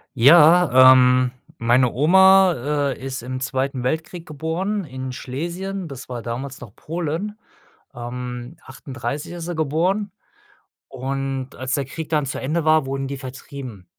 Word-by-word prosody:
Ja, 150 Hz, -1 st, +7 dB
ähm, 125 Hz, 0 st, +4 dB, 0.3 s
meine 120 Hz, +2 st, +3 dB
Oma, 155 Hz, -3 st, +4 dB
äh, -, -, -7 dB
ist 130 Hz, -1 st, -5 dB
im 130 Hz, +1 st, -5 dB
2. 130 Hz, -1 st, -2 dB
Weltkrieg 160 Hz, +4 st, -3 dB
geboren 170 Hz, +7 st, -3 dB
in 130 Hz, -2 st, -6 dB
Schlesien. 175 Hz, +9 st, -5 dB
Das 135 Hz, -3 st, -10 dB
war 120 Hz, -2 st, -5 dB
damals 130 Hz, +4 st, -6 dB
noch 110 Hz, -5 st, -12 dB
Polen. 175 Hz, +6 st, -4 dB, 0.5 s
Ähm, 125 Hz, 0 st, -7 dB
1938 140 Hz, +3 st, -6 dB
ist 175 Hz, -1 st, -6 dB
sie 175 Hz, 0 st, -4 dB
geboren. 175 Hz, +7 st, 0 dB, 0.8 s
Und 135 Hz, 0 st, -4 dB
als 130 Hz, +2 st, -3 dB
der 140 Hz, -, 0 dB
Krieg 155 Hz, +4 st, -7 dB
dann 150 Hz, -3 st, +1 dB
zu 130 Hz, -, -4 dB
Ende 155 Hz, +4 st, -1 dB
war, 155 Hz, -2 st, +3 dB
wurden 135 Hz, 0 st, -3 dB
die 140 Hz, -, -4 dB
vertrieben. 130 Hz, -6 st, -9 dB
140 Hz, 140 wpm, -21 LUFS, 130-165 Hz, 0.8 s, Ja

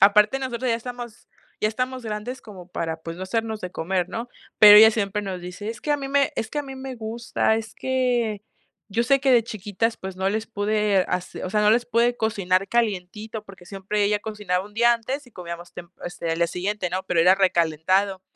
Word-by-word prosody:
Aparte, 210 Hz, +5 st, +5 dB
nosotras 255 Hz, -1 st, -3 dB
ya -, -, +3 dB
estamos 240 Hz, -1 st, -8 dB, 0.3 s
ya 215 Hz, -, +1 dB
estamos 255 Hz, +3 st, -3 dB
grandes 220 Hz, +4 st, -5 dB
como 190 Hz, -5 st, -12 dB
para, 165 Hz, -2 st, -4 dB
pues, 165 Hz, +1 st, -7 dB
no 185 Hz, -, -7 dB
hacernos 220 Hz, +1 st, -2 dB
de 180 Hz, -, -4 dB
comer, 180 Hz, +1 st, -1 dB
¿no? 235 Hz, +2 st, -5 dB, 0.3 s
Pero 210 Hz, -1 st, +10 dB
ella 220 Hz, +1 st, +10 dB
siempre 210 Hz, -1 st, -1 dB
nos 185 Hz, -2 st, -5 dB
dice: 185 Hz, +5 st, -6 dB
"Es 230 Hz, -, -8 dB
que 300 Hz, -, -3 dB
a 295 Hz, -, +3 dB
mí 275 Hz, -1 st, -5 dB
me 280 Hz, 0 st, +2 dB
es 225 Hz, -, -3 dB
que 295 Hz, -, -3 dB
a -, -, 0 dB
mí 270 Hz, -1 st, -8 dB
me 265 Hz, -1 st, -6 dB
gusta, 225 Hz, 0 st, -1 dB
es 225 Hz, 0 st, -6 dB
que 245 Hz, -5 st, 0 dB, 0.5 s
yo 225 Hz, +4 st, 0 dB
sé 275 Hz, +3 st, +3 dB
que 265 Hz, -1 st, +2 dB
de 235 Hz, -2 st, +6 dB
chiquitas, 215 Hz, +1 st, -2 dB
pues, 190 Hz, -1 st, -7 dB
no 190 Hz, +1 st, 0 dB
les 220 Hz, +2 st, -2 dB
pude, 210 Hz, -2 st, +1 dB
hacer 180 Hz, 0 st, -3 dB
o -, -, -5 dB
sea, 210 Hz, +1 st, +2 dB
no 210 Hz, -, +5 dB
les 240 Hz, +2 st, +2 dB
pude 240 Hz, +1 st, +2 dB
cocinar 195 Hz, -3 st, 0 dB
calientito", 215 Hz, -1 st, -2 dB
porque 195 Hz, -3 st, -14 dB
siempre 200 Hz, +2 st, -2 dB
ella 210 Hz, 0 st, +2 dB
cocinaba 205 Hz, -3 st, -3 dB
1 210 Hz, -, -17 dB
día 235 Hz, +1 st, +5 dB
antes 255 Hz, +4 st, -3 dB
y -, -, -17 dB
comíamos 175 Hz, -1 st, -8 dB
temp 175 Hz, 0 st, -10 dB
este, 170 Hz, -1 st, -4 dB
al 165 Hz, -, 0 dB
día 170 Hz, -, +3 dB
siguiente, 185 Hz, +1 st, -3 dB
¿no? 185 Hz, +1 st, -2 dB
Pero 175 Hz, -3 st, +1 dB
era 180 Hz, +3 st, +6 dB
recalentado. 185 Hz, +1 st, +1 dB
210 Hz, 220 wpm, -24 LUFS, 185-235 Hz, 0.5 s, Pero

